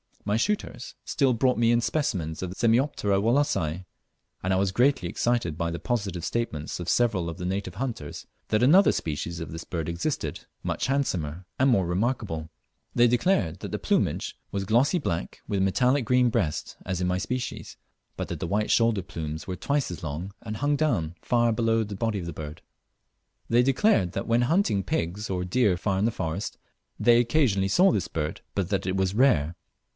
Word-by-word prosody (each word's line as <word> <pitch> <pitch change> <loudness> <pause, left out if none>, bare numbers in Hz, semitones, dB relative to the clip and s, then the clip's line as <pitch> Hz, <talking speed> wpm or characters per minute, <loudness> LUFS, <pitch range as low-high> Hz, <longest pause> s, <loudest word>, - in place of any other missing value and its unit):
My 105 +1 +1
shooters 200 - -2
still 135 -3 +2
brought 125 +2 +2
me 115 0 +4
in 120 0 +3
specimens 95 - -1
of 90 - -3
the 90 - -8
Semioptera 115 -4 +2
Wallacei, 110 - +1 0.6
and 95 +1 0
I - - +3
was 95 0 +1
greatly 125 +7 +2
excited 115 -10 0
by 85 0 -1
the 85 0 -4
positive 100 -8 -2
statements 85 -8 -3
of 85 - -4
several 105 -8 +2
of 80 - -6
the 90 - -5
native 95 0 -3
hunters 115 - -5 0.2
that 110 +2 +2
another 180 +10 +6
species 80 +2 -3
of 80 -3 -6
this 80 +1 -6
bird 80 -2 -4
existed, 85 - -3 0.2
much - - -1
handsomer 90 - -1
and 135 +1 +4
more 100 -7 +3
remarkable. 90 -4 -1 0.5
They 120 0 +6
declared 115 - +1
that - - -6
the - - -1
plumage - - 0
was 100 0 -2
glossy 120 - +3
black, 85 - -3
with 100 -1 0
metallic 125 +7 +2
green 125 +1 +4
breast 75 -9 -1
as 95 -1 -2
in 90 - +1
my 90 0 +1
species, 125 +6 -4 0.4
but - - -4
that - - -4
the - - -3
white 105 +4 0
shoulder 115 -3 +3
plumes 80 -3 -5
were 95 - -4
twice 140 - -1
as 85 - -7
long, 80 +6 -5
and 110 -1 -5
hung 145 +4 +1
down 90 - 0
far 120 -1 +2
below 115 0 +2
the 105 -1 -6
body 110 0 -1
of 85 - -6
the 85 - -5
bird. 75 0 -7 0.9
They 120 +1 +5
declared 135 - +3
that 95 - -3
when 115 +1 +3
hunting 125 - +2
pigs 90 +6 -2
or 90 -1 -1
deer 95 0 +2
far 95 +1 0
in 100 - +2
the 115 - +2
forest 85 0 -4 0.4
they 120 0 +5
occasionally 120 -6 +2
saw 185 - +5
this 100 - 0
bird, 75 -1 -3
but 95 -3 -1
that 95 -2 -1
it 95 - 0
was 95 0 +1
rare. 90 - +3
100 Hz, 190 wpm, -26 LUFS, 85-120 Hz, 0.9 s, another